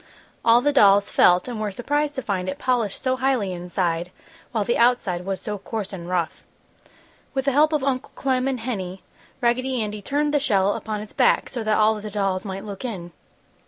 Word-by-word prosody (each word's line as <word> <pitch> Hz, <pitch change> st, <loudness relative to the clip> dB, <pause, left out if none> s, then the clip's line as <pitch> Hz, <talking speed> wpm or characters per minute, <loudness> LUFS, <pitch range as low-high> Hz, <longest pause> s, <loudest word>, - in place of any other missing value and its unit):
All 235 Hz, +1 st, +6 dB
the 290 Hz, +2 st, +2 dB
dolls 200 Hz, -5 st, +5 dB
felt 180 Hz, +3 st, +4 dB
and 235 Hz, -3 st, -4 dB
were 210 Hz, -, -1 dB
surprised 290 Hz, +8 st, -1 dB
to 265 Hz, -, -3 dB
find 185 Hz, -3 st, -2 dB
it 190 Hz, -, -4 dB
polished 240 Hz, -6 st, -1 dB
so 260 Hz, -1 st, +1 dB
highly 255 Hz, -7 st, 0 dB
inside, 175 Hz, -1 st, -2 dB, 0.4 s
while 220 Hz, -4 st, 0 dB
the 235 Hz, +4 st, 0 dB
outside 210 Hz, -8 st, +2 dB
was 195 Hz, -1 st, -2 dB
so 210 Hz, -1 st, -5 dB
coarse 205 Hz, 0 st, -5 dB
and 175 Hz, -2 st, -7 dB
rough. 175 Hz, -3 st, -2 dB, 0.9 s
With 270 Hz, 0 st, 0 dB
the 275 Hz, -, +3 dB
help 300 Hz, +4 st, +4 dB
of 300 Hz, -3 st, 0 dB
Uncle 265 Hz, -1 st, -1 dB
Clem 260 Hz, -1 st, 0 dB
and 260 Hz, -3 st, -2 dB
Henny, 190 Hz, -6 st, -4 dB, 0.4 s
Raggedy 255 Hz, +2 st, +1 dB
Andy 210 Hz, -1 st, -3 dB
turned 290 Hz, +7 st, 0 dB
the 290 Hz, -, +4 dB
shell 200 Hz, -7 st, +2 dB
upon 215 Hz, -1 st, -4 dB
its 210 Hz, -, -10 dB
back, -, -, +3 dB
so 240 Hz, -3 st, -4 dB
that 215 Hz, 0 st, +2 dB
all 215 Hz, 0 st, +3 dB
the 215 Hz, -, -6 dB
dolls 195 Hz, -2 st, -1 dB
might 195 Hz, 0 st, -6 dB
look 200 Hz, +1 st, -7 dB
in. 185 Hz, -8 st, -5 dB
215 Hz, 200 wpm, -23 LUFS, 195-255 Hz, 0.9 s, All